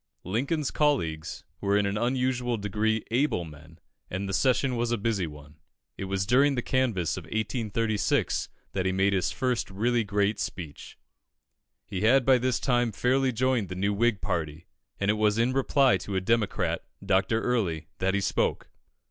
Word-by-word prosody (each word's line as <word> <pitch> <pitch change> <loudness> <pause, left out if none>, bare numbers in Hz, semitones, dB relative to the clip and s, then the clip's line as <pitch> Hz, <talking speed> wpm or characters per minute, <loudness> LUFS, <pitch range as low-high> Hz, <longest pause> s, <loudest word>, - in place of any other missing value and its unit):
Lincoln's 135 - -1
colleagues 85 - 0 0.2
were 100 0 +2
in 105 - +2
an 100 0 -1
unusual 125 +1 0
degree 105 +2 0
able 120 - +1
men, 80 +1 -13 0.3
and 95 +2 -3
the 95 - -3
session 130 +4 +2
was 120 0 -1
a 120 - +1
busy 100 -4 -1
one. 75 0 -13 0.4
It 95 - -5
was 95 0 -1
during 135 +5 +4
the 125 - -2
canvass 115 - 0
of - - -7
1836 110 -1 -1 0.2
that 95 -1 -1
he - - +2
made 95 +1 +2
his 90 -6 +1
first 125 -2 -1
really 115 +4 +1
great 100 +1 0
speech. 80 -6 -6 0.9
He 95 - -4
had 125 +4 +4
by 130 -2 +5
this 125 -1 0
time 120 -3 +1
fairly 130 +5 +1
joined 125 -3 0
the 90 - -5
new 100 +2 0
Whig 115 -1 +1
party, 80 0 -3 0.3
and 100 +1 +2
it 105 0 -2
was 105 0 +3
in 120 +3 +2
reply 135 -4 +3
to 95 +2 -6
a - - +3
Democrat, 110 +2 0 0.2
Dr. 95 +3 +2
Early, 100 -11 -1
that 95 +1 +1
he 100 - +1
spoke. - - -1
105 Hz, 175 wpm, -27 LUFS, 95-125 Hz, 0.9 s, by